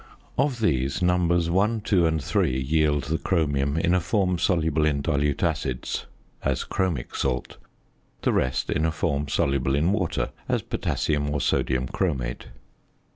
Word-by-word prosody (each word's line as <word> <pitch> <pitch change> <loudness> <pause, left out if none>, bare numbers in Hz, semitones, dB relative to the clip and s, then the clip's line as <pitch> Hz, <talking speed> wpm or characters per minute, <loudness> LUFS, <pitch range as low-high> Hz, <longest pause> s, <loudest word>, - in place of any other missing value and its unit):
Of 130 -5 0
these, 70 - +1
numbers 85 -1 +2
1, 105 +5 +2
2, 90 -5 +3
and 80 -2 -1
3 65 -1 +1
yield 75 +1 +1
the 80 +3 -1
chromium 70 -4 0
in 85 +2 +2
a 90 - +4
form 90 -1 0
soluble 80 -4 +1
in 70 -2 +1
dilute 75 -2 0
acids, 65 -2 -2 0.4
as - - 0
chromic 85 -10 -2
salt. 65 -2 -2 0.7
The - - +2
rest 65 0 0
in 80 - +1
a - - +1
form 75 -3 -1
soluble 70 -1 +1
in 80 +6 +2
water, 95 -6 -1 0.2
as - - +1
potassium 75 -1 -1
or 75 0 -1
sodium 65 0 0
chromate. 65 -8 -2
75 Hz, 150 wpm, -25 LUFS, 70-90 Hz, 0.7 s, a